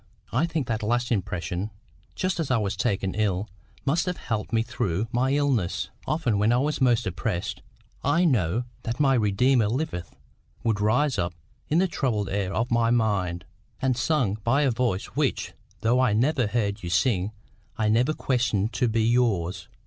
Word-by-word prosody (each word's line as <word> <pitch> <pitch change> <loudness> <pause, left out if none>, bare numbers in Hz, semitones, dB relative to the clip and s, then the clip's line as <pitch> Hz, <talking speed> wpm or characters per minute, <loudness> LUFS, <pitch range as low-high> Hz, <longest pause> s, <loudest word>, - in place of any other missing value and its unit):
I 140 +8 +2
think 160 -5 -2
that 115 -2 -2
last 120 +3 0
impression, 90 -1 -2 0.5
just 185 -1 -1
as 160 - -1
I 130 - +3
was 105 -2 -1
taken 100 -2 0
ill, 100 -2 0 0.4
must 160 +6 +1
have 180 - -1
helped 110 -2 -3
me 115 -1 +2
through 105 -3 -2
my 125 +2 +1
illness. 110 - 0 0.2
Often 130 -10 +1
when 105 +3 +3
I 120 - +4
was 145 +2 0
most 120 -2 +3
oppressed, 90 -1 -3 0.4
'I 170 +6 +3
know 115 - +2 0.2
that 120 +2 -4
my 135 -2 +4
Redeemer 115 +1 +3
liveth' 90 - -3 0.5
would 110 -3 +1
rise 125 +6 +2
up 85 0 -1 0.3
in 155 - +2
the 190 +2 +4
troubled 115 - -1
air 95 -1 -1
of 115 +5 -1
my 115 0 +3
mind, 100 -7 +1 0.3
and 130 -1 +1
sung 125 -5 +1
by 135 +5 +3
a 135 - +3
voice 115 -5 0
which, - - -1 0.3
though 120 +3 +3
I 125 -5 +3
never 125 +2 +2
heard 100 -2 -1
you 85 - -5
sing, 95 +2 +1 0.5
I 110 - +1
never 120 +8 +3
questioned 120 -7 0
to 125 - +1
be 115 0 +1
yours." 100 -7 +1
115 Hz, 175 wpm, -26 LUFS, 100-130 Hz, 0.5 s, I